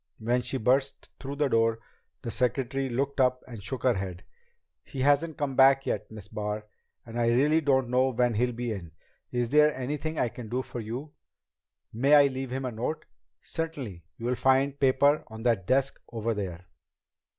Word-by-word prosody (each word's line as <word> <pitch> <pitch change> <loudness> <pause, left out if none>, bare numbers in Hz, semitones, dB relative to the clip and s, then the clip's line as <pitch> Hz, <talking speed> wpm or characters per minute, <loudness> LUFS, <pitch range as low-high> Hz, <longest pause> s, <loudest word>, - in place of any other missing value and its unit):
When 120 +3 0
she 135 - -2
burst 135 +4 0
through 140 +1 -5
the 145 0 +1
door, 115 -2 +2 0.5
the 115 - -3
secretary 135 +2 0
looked 135 +3 -1
up 125 0 +2
and 115 -5 -9
shook 120 +6 -4
her 125 - +4
head. 95 -3 -5 0.6
"He 135 - -6
hasn't 145 +3 +2
come 140 -2 -2
back 135 0 +6
yet, - - -2
Miss 105 -3 -10
Barr. 105 0 -4 0.4
And 115 0 -5
I 120 - +2
really 145 +7 +3
don't 135 -3 +2
know 130 +1 +3
when 125 -1 +1
he'll 125 +3 +1
be 120 0 -3
in. 85 -7 -6 0.4
Is 120 -1 -1
there 150 0 +5
anything 150 +4 -3
I 120 - +1
can 115 -1 -9
do 125 +3 -1
for 120 - -7
you?" 120 +7 -6 0.8
"May 135 +6 +4
I 145 -1 +8
leave 135 -1 -2
him 130 +1 -3
a 125 - -2
note?" 120 +8 -3 0.4
"Certainly. 140 - -5
You'll 120 +2 -1
find 135 +2 +2
paper 140 +2 +3
on 110 0 -9
that 115 -7 +1
desk 135 +1 +1
over 115 0 -1
there." 90 -4 -5
125 Hz, 185 wpm, -28 LUFS, 115-135 Hz, 0.8 s, I